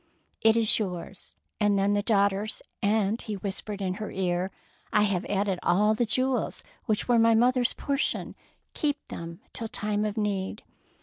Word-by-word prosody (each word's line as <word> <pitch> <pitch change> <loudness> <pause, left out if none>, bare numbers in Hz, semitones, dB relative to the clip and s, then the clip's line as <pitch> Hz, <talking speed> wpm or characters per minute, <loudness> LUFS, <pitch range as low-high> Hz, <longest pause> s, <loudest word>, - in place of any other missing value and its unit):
"It 225 0 +5
is 225 -1 +5
yours, 185 -2 -5 0.2
and 205 -2 +3
then 200 +1 +2
the 205 - +2
daugh 200 -2 +3
ter's, 205 +3 -5 0.2
and," 210 +1 +1
he 215 -3 -4
whispered 200 +1 -4
in 185 -1 0
her 215 - -3
ear, 180 0 -1 0.2
" - - -34
I 210 - +4
have 200 -3 0
added 195 -2 0
all 210 +4 +3
the 230 +2 0
jewels 255 +3 0 0.2
which 215 -2 0
were 240 -2 +4
my 225 0 +5
mother's 245 +2 +3
portion. 280 0 -1 0.4
Keep 290 -1 -2
them 170 0 -7
till 225 - -3
time 210 -2 -1
of 215 +1 -2
need." 205 -1 -2
210 Hz, 175 wpm, -27 LUFS, 195-225 Hz, 0.4 s, It